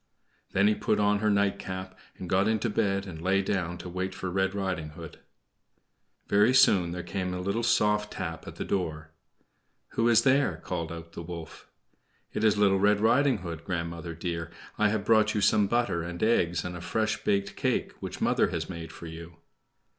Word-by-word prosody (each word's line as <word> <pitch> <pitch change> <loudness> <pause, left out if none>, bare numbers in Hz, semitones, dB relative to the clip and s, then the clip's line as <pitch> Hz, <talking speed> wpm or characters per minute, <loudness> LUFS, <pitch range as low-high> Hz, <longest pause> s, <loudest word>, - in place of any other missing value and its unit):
Then 100 +1 +4
he 105 - +4
put - - 0
on 105 0 +3
her 105 0 +1
night 100 -1 +2
cap 95 0 -6 0.2
and 95 - -7
got 95 +3 +2
into 110 +1 0
bed, 100 -2 0
and 80 -5 -8
lay 95 +2 +2
down 90 -3 -2
to 90 - -8
wait 95 +1 -3
for 95 -1 -4
Red 95 +1 0
Riding 95 -6 -2
Hood. 80 -1 -10 1.1
Very 105 +5 +4
soon 95 -8 +5
there 90 0 -5
came 90 -2 -3
a - - -4
little 100 +5 -1
soft 105 -2 +2
tap - - -5
at - - -8
the - - -4
door. 80 -4 -3 0.8
"Who 115 +1 +1
is 115 - +5
there?" 140 +1 +3
called 85 -3 -4
out 85 0 -8
the - - -6
wolf. 85 -1 -9 0.6
"It - - -2
is 105 -1 +4
Little 100 -2 +4
Red 105 +1 +4
Riding 115 -1 +3
Hood, 85 -1 -6
grandmother 85 -1 -4
dear. 85 -1 -4 0.3
I 105 0 +3
have 105 -1 -1
brought 110 -1 +4
you 105 - +1
some 100 0 +4
butter 120 -6 +1
and 85 +2 -5
eggs 90 -7 +2
and 90 0 -4
a 90 - -7
fresh 110 +4 -1
baked 100 0 0
cake - - 0
which - - -6
mother - - +2
has - - -3
made 85 -2 -7
for - - -10
you." 80 +1 -9
95 Hz, 195 wpm, -28 LUFS, 85-105 Hz, 1.1 s, soon